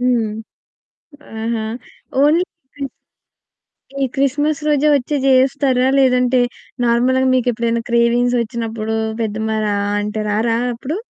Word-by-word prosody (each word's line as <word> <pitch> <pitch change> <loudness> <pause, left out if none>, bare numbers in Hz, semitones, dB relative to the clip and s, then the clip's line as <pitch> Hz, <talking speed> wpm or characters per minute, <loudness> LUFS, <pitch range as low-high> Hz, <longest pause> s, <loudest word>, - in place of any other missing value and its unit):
హ్మ్. 240 -4 +1 1.1
ఆహా! 225 -1 -2 0.6
Only 315 +5 +4 0.3
Chris 280 -2 -5 1.1
ఈ - - +4
క్రిస్మస్ 290 +3 0
రోజే 300 0 +3
వచ్చి 285 +2 0
జేస్తారా? 260 -1 +3
లేదంటే 250 -1 +3 0.4
నార్మల్‌గా 250 +2 +2
మీకు 255 -1 +1
ఎప్పుడైనా 235 0 -1
క్రేవింగ్స్ 235 +1 +2
వచ్చినప్పుడు 225 -1 -3 0.3
పెద్దమ్మ 220 0 -2
రా 205 -1 0 0.3
అంటే, 210 +1 -3
రారా 225 +2 +1 0.2
అప్పుడు? 265 +7 -4
245 Hz, 110 wpm, -18 LUFS, 230-270 Hz, 1.1 s, Only